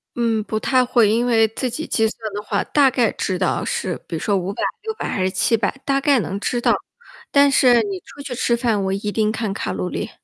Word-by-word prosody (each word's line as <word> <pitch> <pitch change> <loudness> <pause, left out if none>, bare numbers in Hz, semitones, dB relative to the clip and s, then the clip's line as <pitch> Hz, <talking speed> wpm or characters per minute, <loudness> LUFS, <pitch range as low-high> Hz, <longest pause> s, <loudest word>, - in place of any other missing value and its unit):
嗯， 230 -2 0
不 215 +1 -3
太 255 +3 +2
会。 240 -3 +3
因 230 +3 +2
为 225 -2 +4
自 240 +4 -3
己 315 +7 -5
计 220 -1 +2
算 220 -1 -6
的 205 - -3
话， 210 - -1
大 280 -3 +3
概 240 -4 +2
知 185 -2 -2
道 185 - 0
是 185 -2 -2
比 170 - -5
如 - - -3
说 205 - 0
500、 190 +1 -3 0.2
600 440 0 -4
还 190 - -1
是 185 - +1
700， 210 0 +1
大 275 0 +1
概 280 -2 +3
能 195 -2 -3
知 240 +4 -1
道。 - - +3 0.6
但 280 0 +5
是 250 -3 +5
你 200 -3 -4
出 285 - -12
去 275 -3 -5
吃 235 0 +1
饭， 230 -4 0
我 190 - -1
一 200 +2 -3
定 215 0 +1
看 220 -2 -3
卡 145 - -3
路 90 -1 -3
里， - - -4
225 Hz, 240 characters per minute, -21 LUFS, 200-250 Hz, 0.6 s, 但